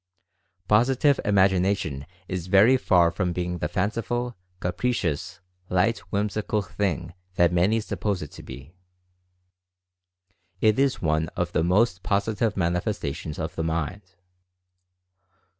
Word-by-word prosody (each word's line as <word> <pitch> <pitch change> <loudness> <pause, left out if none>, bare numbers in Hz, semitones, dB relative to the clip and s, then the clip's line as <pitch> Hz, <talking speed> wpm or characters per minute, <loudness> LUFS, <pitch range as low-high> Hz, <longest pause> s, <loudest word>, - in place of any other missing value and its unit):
Positive 130 - +3
Imagination 95 -7 +2 0.2
is 90 -2 -4
very 100 +7 +6
far 90 -9 +3
from 90 0 -1
being 90 0 -3
the 75 - -1
fanciful, 115 +7 -2 0.2
capricious, 90 -4 -2 0.3
light, 105 +6 +2
whimsical 105 +1 -1
thing 90 -4 -2 0.2
that 85 -1 +3
many 95 +6 +3
suppose 105 -4 -2
it 75 - -9
to - - -11
be. 70 +6 -11 1.9
It 110 +2 +3
is 135 -6 +1
one 80 0 +1
of - - -1
the 80 - +1
most 90 +1 +2
positive 105 +3 0
manifestations 85 -4 -2
of 80 +1 -4
the 80 - -3
mind. 85 +4 -3
95 Hz, 115 wpm, -25 LUFS, 85-105 Hz, 1.9 s, very